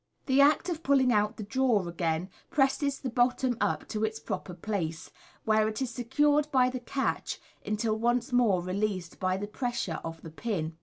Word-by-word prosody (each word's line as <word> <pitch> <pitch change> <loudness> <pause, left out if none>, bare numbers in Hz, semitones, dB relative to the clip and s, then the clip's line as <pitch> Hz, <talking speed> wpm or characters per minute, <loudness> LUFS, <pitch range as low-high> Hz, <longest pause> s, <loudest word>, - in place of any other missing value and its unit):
(See 265 - -1
Fig. - - +5
91.) 280 - +9
The 305 - +3
act 355 - -8
of 330 -2 -3
pull 280 0 +4
ing 255 -2 +3
out 210 +1 +1
the 215 - -5
drawer 225 -4 +1
again 170 +1 -1 0.2
presses 275 0 +2
the 265 - -4
bottom 245 +1 +2
up - - 0
to 215 -1 -2
its 220 0 -1
proper 185 -3 -5
place, 170 -5 -3 0.3
where 215 0 +3
it 215 0 -3
is 260 -3 -2
secured 295 +5 +2
by 255 -1 +4
the 255 - -4
catch 265 +3 -2 0.2
until 215 +1 -1
once 240 +2 +1
more 215 -8 +3
released 185 -1 -2
by 185 0 +1
the 205 - -3
pressure 210 - -3
of 165 0 -7
the 160 - -8
pin. 165 -4 -3
220 Hz, 205 wpm, -29 LUFS, 185-260 Hz, 0.3 s, 91